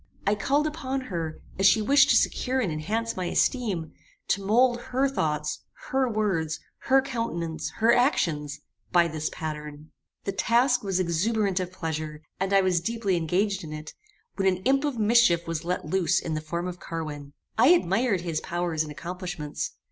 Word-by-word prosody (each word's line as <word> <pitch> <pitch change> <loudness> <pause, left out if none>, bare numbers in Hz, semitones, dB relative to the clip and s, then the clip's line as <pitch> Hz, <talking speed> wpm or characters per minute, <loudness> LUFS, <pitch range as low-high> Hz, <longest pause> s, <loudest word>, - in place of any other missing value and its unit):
I 200 - +3
called 280 +8 +1
upon 270 -4 -2
her, 165 -3 -3 0.2
as 195 - +6
she 220 - +5
wished 270 +6 +5
to - - +5
secure 260 +1 +1
and 205 -10 0
enhance 215 +10 -2
my 185 - -3
esteem, 190 - 0 0.4
to 195 - +1
mould 240 +4 +3
her 265 +2 +1
thoughts, 150 - -1 0.3
her 265 -1 +2
words, 190 -8 -1 0.3
her 270 0 +5
countenance, 170 - -3
her 230 +1 +4
actions, 150 - +1 0.3
by 175 -2 +5
this 155 -1 -3
pattern. 150 -1 -6 0.3
"The 195 - -2
task 240 +6 +2
was 190 -2 0
exuberant 190 +3 +1
of 180 -1 -3
pleasure, 155 -3 -5 0.2
and 195 +1 -1
I 195 0 +5
was 185 -3 +2
deeply 220 -1 -1
engaged 190 +4 0
in 155 - -8
it, 155 0 -7 0.4
when 195 - +2
an 185 0 +1
imp 275 +3 +3
of 285 -5 -2
mischief 215 -6 +4
was 165 -1 -3
let 180 -2 -2
loose 175 +2 +2
in 165 - -4
the 155 - -2
form 170 +3 -3
of 180 -1 -6
Carwin. 150 -3 -6 0.2
I - - +5
admired 225 - +3
his 170 -3 -2
powers 175 -3 -2
and 155 -1 -3
accomplishments. 175 0 -5
185 Hz, 175 wpm, -26 LUFS, 160-230 Hz, 0.4 s, as